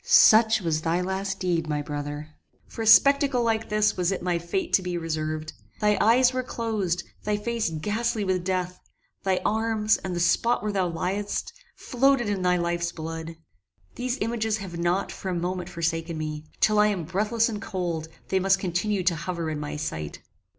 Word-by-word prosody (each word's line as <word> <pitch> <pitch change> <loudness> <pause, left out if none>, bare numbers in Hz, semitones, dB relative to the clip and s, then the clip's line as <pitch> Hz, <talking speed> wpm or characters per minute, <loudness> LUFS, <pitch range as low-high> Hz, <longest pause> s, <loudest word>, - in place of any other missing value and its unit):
Such 220 0 +6
was 160 -3 0
thy 165 +2 0
last 190 +1 -3
deed, 170 -4 0
my 150 -1 -1
brother! 145 +1 -5 0.4
For - - -8
a 220 - -1
spectacle 275 +2 +6
like 225 -1 0
this 210 0 +2
was 180 0 +1
it 190 - -3
my 175 -1 0
fate 170 +3 -3
to - - +5
be 180 -1 -3
reserved! 155 -1 -3 0.3
Thy 210 0 +3
eyes 245 +3 +5
were 255 - 0
closed 215 -8 -2 0.2
thy 210 0 0
face 230 -1 -1
ghastly 210 +7 -1
with 185 -2 0
death 180 -1 -2 0.4
thy 190 -1 +1
arms, 220 0 +2
and 185 -2 -5
the - - -1
spot 195 +8 +2
where 210 - -1
thou 190 -3 +1
liedest, 195 - -3 0.2
floated 255 -2 +2
in 200 -2 -1
thy 180 0 +3
life's 170 0 -1
blood! 165 0 -6 0.6
These 250 +1 -2
images 220 -1 0
have 190 -4 -7
not, 175 +3 0
for 190 - -6
a 180 - -1
moment, 180 +1 -3
forsaken 165 -1 -2
me. 155 0 -4
Till 215 -1 +4
I 210 - +6
am 200 -5 -1
breathless 210 +7 +1
and 215 -3 -4
cold, 170 -4 -3 0.2
they 190 - +2
must 195 +1 +3
continue 190 +2 -1
to 175 - +3
hover 165 0 -3
in 150 - -3
my 150 0 -4
sight. 80 - -4
185 Hz, 185 wpm, -26 LUFS, 170-215 Hz, 0.6 s, Such